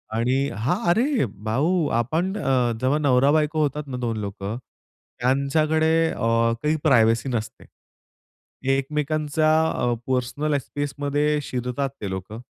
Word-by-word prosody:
आणि 130 +4 +1
हां, 120 +11 0
अरे 240 - +2 0.2
भाऊ 155 +8 +1
आपण 165 - -1
अ, 130 - +1
जेव्हा 130 +3 +2
नवरा-बायको 150 +3 +3
होतात 150 0 -1
ना 130 -2 -5
2 120 -3 -2
लोकं, 100 +1 -5 0.6
त्यांच्याकडे 155 +5 +2 0.2
अ, - - -7 0.4
काही 150 +1 +2
प्रायव्हसी 115 -3 +3
नसते. 110 -3 -4 1.1
एकमेकांच्या 150 +2 0 0.2
अ, 120 0 0
पर्सनल 130 +4 0
स्पेसमध्ये 145 +2 -1
शिरतात 125 +2 -3
ते 100 - -3
लोकं, 95 +4 -6
140 Hz, 115 wpm, -23 LUFS, 125-150 Hz, 1.1 s, नवरा-बायको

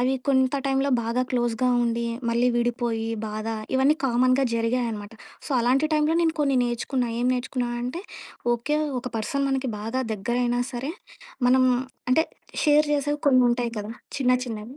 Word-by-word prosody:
అవి 255 +2 +2
కొంత 260 0 +3
టైంలో 270 +1 +1
బాగా 235 +2 0
క్లోజ్‌గా 240 0 +1 0.2
ఉండి, 235 0 -1 0.2
మళ్ళీ 240 +2 +2
విడిపోయి 235 -1 -1 0.2
బాధ, 215 +1 -5 0.3
ఇవన్నీ 270 +4 +4
కామన్‌గా 255 +2 +3
జరిగాయనమాట. 230 -2 -1 0.3
సో, - - -9
అలాంటి 265 +6 +2
టైంలో 305 +2 +2
నేను 325 -1 +2
కొన్ని 275 -2 +2
నేర్చుకున్నా, 240 +1 -1
ఏం 245 - +2
నేర్చుకున్నా 250 0 -2
అంటే, 255 +9 -4 0.5
ఓకే. 295 +6 -1 0.2
ఒక 250 - -5
పర్సన్ 275 +6 -1
మనకి 265 -1 -1
బాగా 225 +5 -2
దెగ్గరైనా 240 +4 0
సరే, 255 +4 -3 0.6
మనం 255 +1 +5 0.5
అంటే, 320 +5 +4 0.4
షేర్ 300 -1 +4
జేసేవి 290 +1 0
కొన్నుంటాయి 245 -2 +3
కదా! 210 +2 -5 0.3
చిన్న 250 -2 +3
చిన్నవి. 225 +3 -7
250 Hz, 145 wpm, -25 LUFS, 235-270 Hz, 0.6 s, మనం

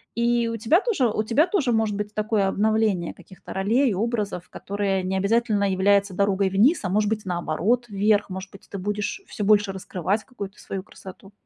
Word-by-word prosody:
И 235 0 +2
у 230 - -3
тебя 250 - +3
тоже 385 - +1
у 215 0 -1
тебя 260 +10 +3
тоже 350 -10 +1
может 220 -2 +1
быть 210 0 -4
такое 215 -2 +1
обновление 210 -4 +1
каких-то 185 - -12
ролей, 220 +5 +2
образов, 210 -4 -2
которые 195 -1 -2
не 190 +1 -1
обязательно 210 +1 +1
являются 200 +1 +2
дорогой 200 0 +2
вниз, 225 - +3
а 185 - -1
может 210 +2 +1
быть, 220 -1 -1
наоборот, 185 +7 0
вверх, 205 +1 +2
может 190 0 -6
быть, 195 - -15
ты 200 - -6
будешь 205 - -3
всё 210 - -5
больше 205 -1 +4
раскрывать 190 +1 -2
какую-то 205 -6 -8
свою 195 -1 -6
красоту. 195 0 -13
205 Hz, 185 wpm, -24 LUFS, 195-225 Hz, -, больше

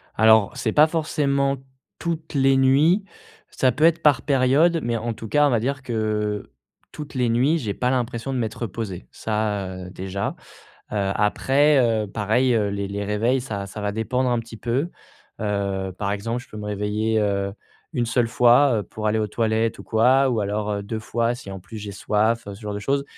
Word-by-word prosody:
Alors, 110 -2 +5
c'est 110 - -1
pas 150 +1 +6
forcément, 140 -4 0 0.4
toutes 165 -2 -4
les 135 -1 +4
nuits, 145 +9 +4 0.5
ça 130 - +2
peut 145 +6 -2
être 170 0 +3
par 145 -5 +4
période, 145 +5 +3
mais 120 0 0
en 115 +1 -3
tout 110 0 -8
cas, 145 0 +4
on - - +2
va 120 -4 +2
dire 130 +3 -2
que, 105 -3 -2 0.4
toutes 150 -1 -8
les 125 -2 +1
nuits, 130 +8 +3
j'ai 110 -10 -3
pas 125 - -1
l'impression 125 0 -2
de 130 - -1
m'être 115 +1 -3
reposé, 95 - -5
ça, 105 -4 -2
heu, - - -8
déjà. 95 +1 -4 0.6
Heu, - - -4 0.2
après, 135 +7 +3 0.3
heu, - - -6
pareil, 110 +5 +1
heu, 105 -2 +1
les 100 0 -3
les 100 +1 -3
réveils 115 +5 +1
ça 100 -6 -4
ça 100 +2 -8
va 105 0 -1
dépendre 125 +4 0
un 120 - +1
petit 115 0 -8
peu. 130 +10 -1 0.5
Heu, 100 -3 -2
par 100 -1 -1
exemple, 115 +4 -3
je - - -19
peux 110 - -11
me 105 - -6
réveiller, 105 +2 -1
heu, 100 -1 0 0.4
1 120 -6 0
seule 115 +1 +1
fois, 120 +2 +4
heu, - - -4
pour 110 +3 -6
aller 110 +1 +2
aux 105 - 0
toilettes 110 0 0
ou - - -8
quoi, 130 +4 +3
ou 115 -3 0
alors, 105 +1 -2
heu, 100 -1 -3
2 110 +2 -4
fois, 115 +2 -1
si 100 - -10
en 95 -1 -7
plus 95 +5 -11
j'ai 105 -1 -6
soif, 110 +3 0
heu, 100 - -6
ce 100 - -13
genre 105 - -4
de 100 - -3
choses. 140 +7 -1
115 Hz, 205 wpm, -23 LUFS, 105-130 Hz, 0.6 s, pas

